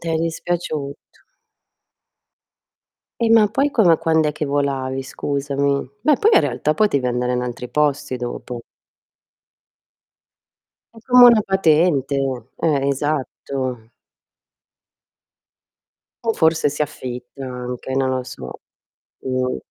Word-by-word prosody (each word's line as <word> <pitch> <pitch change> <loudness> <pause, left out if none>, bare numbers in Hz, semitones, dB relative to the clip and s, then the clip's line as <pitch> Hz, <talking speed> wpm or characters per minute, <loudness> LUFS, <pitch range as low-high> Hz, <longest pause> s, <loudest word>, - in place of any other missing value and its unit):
T'è 165 -1 -2
dispiaciuto. 160 -3 -3 2.2
E 230 -1 +2
ma 220 -2 +6
poi 275 +6 +1
come 180 - +4
quand'è 160 -2 +1
che 150 +1 -4
volavi, 135 -2 -1
scusami? 140 0 -2
Beh, 295 +1 +4
poi 440 - +3
in - - +7
realtà 150 +1 -1
potevi 140 -12 +1
andare 125 0 -1
in 125 - 0
altri 125 0 -5
posti 150 -2 0
dopo. 120 0 -6 2.3
È 225 - -13
come 250 -1 +7
una 230 -3 +6
patente, 160 -7 +2 0.4
eh, 140 -4 0
esatto. 135 -4 -3 2.3
O 225 - +2
forse 160 -1 +2
si 145 - -2
affitta 130 -2 -6
anche, 125 +1 -5
non 135 -1 +1
lo 130 -1 -1
so. 65 - -9 0.6
Mh. 130 -1 -1
140 Hz, 105 wpm, -20 LUFS, 130-165 Hz, 2.3 s, in